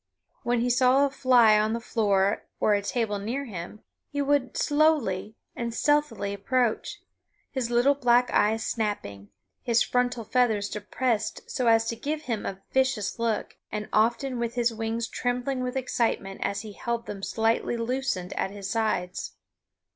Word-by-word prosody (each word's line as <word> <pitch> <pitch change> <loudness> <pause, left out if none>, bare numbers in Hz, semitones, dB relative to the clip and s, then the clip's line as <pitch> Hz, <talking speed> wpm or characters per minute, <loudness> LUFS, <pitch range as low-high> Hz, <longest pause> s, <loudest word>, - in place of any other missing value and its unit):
When 240 -1 +1
he 245 - +1
saw 260 +2 +4
a 280 - -2
fly 240 -6 +5
on 215 +1 +1
the 230 - -1
floor 205 -4 +1
or 205 -1 +3
table 210 -1 -1
near 245 +8 -3
him 200 -1 -8 0.3
he 285 - -4
would 285 -2 +1
slowly 285 -10 +2 0.2
and 235 -1 -4
stealthily 295 -9 +1
approach, 235 +3 -1 0.5
his 255 -4 -2
little 240 +4 +4
black 245 -2 +3
eyes 220 +2 +2
snapping, 155 - -3 0.3
his 235 -3 +3
frontal 245 -1 0
feathers 220 -3 +1
depressed 215 +1 -2
so 250 - 0
as 225 0 +5
to 230 - -2
give 300 +6 -3
him 230 -6 -3
a 195 0 -6
vicious 260 -6 0
look, 230 -2 -1
and 210 0 -4
often 235 +4 +1
with 235 0 -2
his 240 -1 +1
wings 225 +1 -2
trembling 250 +2 -2
with 250 +1 -2
excitement 230 -6 -1
as 200 +1 -1
he 215 -2 -9
held 235 +2 -3
them 200 -1 -6
slightly 225 +3 0
loosened 230 -6 -2
at - - -1
his 200 -1 -7
sides. 205 -5 -1
230 Hz, 155 wpm, -27 LUFS, 210-255 Hz, 0.5 s, fly